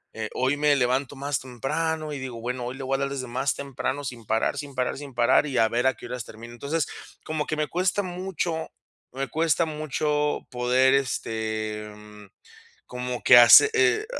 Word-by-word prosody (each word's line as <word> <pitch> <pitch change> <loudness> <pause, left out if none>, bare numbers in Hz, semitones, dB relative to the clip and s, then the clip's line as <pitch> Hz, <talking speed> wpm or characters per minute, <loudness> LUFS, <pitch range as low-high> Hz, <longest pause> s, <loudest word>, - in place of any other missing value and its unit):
Eh, 110 -1 -4
hoy 130 +3 +1
me 145 0 +3
levanto 130 +2 0
más 140 0 -2
temprano 155 +5 -3
y 140 - -5
digo: 130 -3 -6
"Bueno, 125 +1 -3
hoy 125 +2 -5
le 135 - -7
voy 135 +1 0
a 135 - -2
dar 140 - -1
desde 135 -2 -4
más 130 +3 -1
temprano, 140 0 -4
sin 120 -4 -7
parar, 110 +2 0
sin 145 -2 -8
parar, 125 -1 -1
sin 140 -1 -9
parar 120 +4 +4
y 135 -3 -3
a 115 - +5
ver 120 +3 +1
a 130 - +2
qué - - -12
horas 125 0 -5
termino". 115 +2 -11
Entonces, 145 +6 -2 0.4
como 155 -1 -2
que 155 - -1
me 150 0 -1
cuesta 185 +4 0
mucho 180 -3 -3 0.5
me 135 +1 -2
cuesta 165 +3 +1
mucho 150 -1 -1
poder, 125 +2 +3
este, 110 -5 -2
mm, 105 0 -14 0.6
como 125 0 -5
que 120 - +8
hace 120 - +9
eh, 430 0 +3
135 Hz, 195 wpm, -25 LUFS, 125-150 Hz, 0.6 s, hace